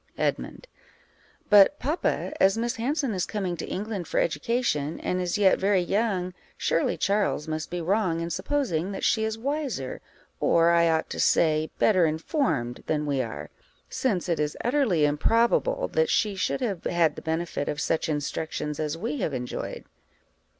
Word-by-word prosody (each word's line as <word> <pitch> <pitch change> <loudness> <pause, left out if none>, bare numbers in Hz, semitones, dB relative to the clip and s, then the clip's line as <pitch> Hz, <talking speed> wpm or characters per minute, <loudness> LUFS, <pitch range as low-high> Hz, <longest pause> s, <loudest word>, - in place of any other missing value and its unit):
Edmund. - - -2 0.8
But, 205 +8 +6
papa, 305 +5 -1
as 195 +2 +4
Miss 235 +2 -1
Hanson 270 +1 -1
is 185 -2 -1
coming 190 -5 -2
to - - -5
England 200 -3 -4
for - - 0
education, 160 - -1
and 180 0 -1
is 180 +2 -1
yet 195 -2 +4
very 195 -2 +2
young, 190 -2 0 0.2
surely 165 - 0
Charles 200 -6 0
must 155 0 -3
be 175 0 -3
wrong 180 -1 +1
in 170 0 -3
supposing 190 - -1
that - - -6
she 220 - +2
is 220 0 -2
wiser, 265 - -3 0.4
or, 170 0 +4
I 170 0 +4
ought 160 -1 0
to - - -5
say, 155 -1 +3
better 185 -6 +4
informed, 155 - -1
than 150 -1 0
we 140 -2 0
are, 115 -3 -6 0.4
since 200 -10 -1
it 170 -3 0
is 150 0 -1
utterly 240 - +2
improbable 230 - +2
that 480 -1 +1
she 210 -2 +2
should 190 - -1
have 200 -9 -2
had 165 -3 +2
the - - -8
benefit 160 -2 -2
of 150 - -3
such 160 +1 0
instructions 150 0 -3
as 155 0 -2
we 230 - -3
have 160 - -2
enjoyed. 125 -1 -5
180 Hz, 165 wpm, -26 LUFS, 160-225 Hz, 0.8 s, But